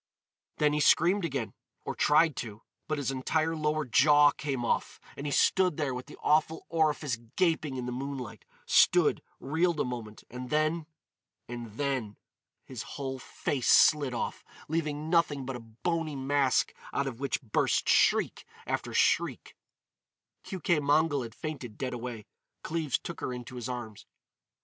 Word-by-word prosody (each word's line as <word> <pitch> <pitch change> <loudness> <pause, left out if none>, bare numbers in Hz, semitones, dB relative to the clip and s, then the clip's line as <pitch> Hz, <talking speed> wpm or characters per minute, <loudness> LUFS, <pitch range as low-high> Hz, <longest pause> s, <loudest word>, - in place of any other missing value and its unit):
Then 150 -1 +3
he 150 - +1
screamed 175 +5 +4
again—or 135 -7 -6
tried 155 0 +4
to—but 115 +7 -6
his 140 -2 -1
entire 155 +5 0
lower 155 0 0
jaw 145 +4 +6
came 135 -5 -3
off - - -1 0.2
and 140 - -5
he - - -2
stood 180 +2 +3
there 145 -4 -1
with 125 0 -6
the - - -12
awful 155 +1 +2
orifice 155 -5 +1 0.2
gaping 160 -6 +1
in 125 - -4
the 125 - -3
moonlight—stood, 125 -4 +1 0.2
reeled 160 +3 0
a - - +3
moment—and 125 +1 -7
then—and 155 -7 -4
then—his 130 -1 -6 0.2
whole 135 -2 -4
face 130 0 -3
slid 145 -5 +5
off, - - -3 0.2
leaving 155 -1 -2
nothing 150 -6 +2
but 135 0 -4
a - - -6
bony 150 +8 -3
mask 135 0 +1 0.2
out 140 - 0
of 130 -3 -5
which 140 -2 -1
burst 110 - +1
shriek - - +3 0.2
after - - -3
shriek—— - - +1 0.9
Keuke 175 -4 0
Mongol 145 0 +2
had 115 -1 -7
fainted 135 -9 -6
dead 130 -2 -3
away. 120 -3 -6 0.4
Cleves 155 -4 -1
took 170 - -8
her - - -2
into 125 0 -7
his 120 0 -5
arms. 115 -4 -6
140 Hz, 140 wpm, -29 LUFS, 125-155 Hz, 0.9 s, jaw